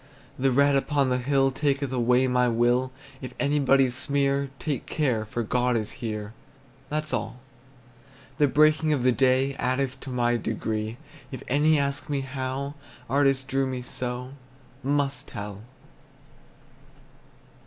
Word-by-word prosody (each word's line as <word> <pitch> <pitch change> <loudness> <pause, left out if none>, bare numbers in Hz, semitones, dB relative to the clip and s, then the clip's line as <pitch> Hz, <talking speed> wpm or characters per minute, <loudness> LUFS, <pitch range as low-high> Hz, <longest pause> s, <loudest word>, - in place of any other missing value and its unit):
The 135 +1 +3
red 140 +2 +4
upon 140 0 +1
the 125 0 +1
hill 135 +1 +2
Taketh 140 0 0
away 125 +1 +3
my 125 -1 +2
will; 120 +2 +2 0.3
If 130 -2 -7
anybody 135 -2 +3
sneer, 140 +1 0
Take 145 -4 -3
care, 125 -8 0
for 120 +2 -3
God 125 +2 +1
is 110 -1 -3
here, 105 -2 -4 0.6
That's 155 0 -2
all. 125 - -3 1.0
The 145 - +5
breaking 155 +2 +4
of 135 -4 0
the 130 - +5
day 130 +2 +2
Addeth 130 +1 -1
to 135 - -8
my 120 -1 +1
degree; 110 0 -3 0.3
If 130 - -7
any 150 +4 +3
ask 140 0 -2
me 140 -2 0
how, 135 +1 -4 0.4
Artist, 135 -1 +2
who 135 - -1
drew 135 -1 +2
me 130 -1 -4
so, 125 +1 -4 0.5
Must 140 0 0
tell! 105 -3 -7
130 Hz, 140 wpm, -26 LUFS, 125-140 Hz, 1.0 s, The